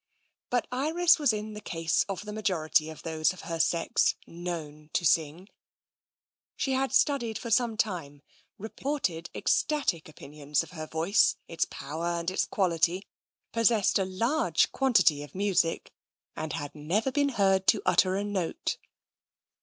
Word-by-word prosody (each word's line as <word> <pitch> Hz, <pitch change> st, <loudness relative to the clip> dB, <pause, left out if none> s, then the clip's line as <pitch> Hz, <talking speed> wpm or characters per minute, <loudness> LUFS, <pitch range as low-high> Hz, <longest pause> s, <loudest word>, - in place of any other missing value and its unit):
But 245 Hz, -1 st, +1 dB
Iris 320 Hz, +7 st, +3 dB
was 290 Hz, -5 st, +3 dB
in 215 Hz, 0 st, -4 dB
the 210 Hz, -, -8 dB
case 165 Hz, -4 st, 0 dB
of 195 Hz, +1 st, -4 dB
the 210 Hz, -, -6 dB
majority 160 Hz, -7 st, +1 dB
of 160 Hz, -, -10 dB
those 160 Hz, +1 st, 0 dB
of 185 Hz, -, -11 dB
her 165 Hz, -1 st, -5 dB
sex 165 Hz, +1 st, +2 dB
known 160 Hz, -3 st, -7 dB
to 175 Hz, -, 0 dB
sing. 165 Hz, +3 st, +1 dB, 1.1 s
She 270 Hz, -, -1 dB
had 265 Hz, +1 st, 0 dB
studied 240 Hz, -6 st, +2 dB
for 235 Hz, -, -6 dB
some 230 Hz, -1 st, +2 dB
time, 155 Hz, -10 st, -3 dB, 0.3 s
reported 220 Hz, -, -3 dB
ecstatic 205 Hz, -, 0 dB
opinions 150 Hz, -1 st, -3 dB
of -, -, -13 dB
her 155 Hz, -3 st, -7 dB
voice, 165 Hz, +7 st, +2 dB
its 165 Hz, -, -1 dB
power 160 Hz, +5 st, -5 dB
and 170 Hz, +1 st, -2 dB
its 185 Hz, -, 0 dB
quality, 180 Hz, 0 st, +1 dB, 0.5 s
possessed 230 Hz, -4 st, +3 dB
a 190 Hz, -, +1 dB
large 230 Hz, -, +1 dB
quantity 185 Hz, -, +3 dB
of 145 Hz, -, -11 dB
music, 190 Hz, -4 st, 0 dB, 0.4 s
and 155 Hz, -1 st, -4 dB
had 145 Hz, -1 st, -5 dB
never 180 Hz, -, -1 dB
been 285 Hz, +1 st, +2 dB
heard 195 Hz, -5 st, +2 dB
to -, -, +4 dB
utter 185 Hz, 0 st, +3 dB
a 200 Hz, -, -1 dB
note. 195 Hz, -5 st, -2 dB
185 Hz, 150 wpm, -28 LUFS, 160-225 Hz, 1.1 s, to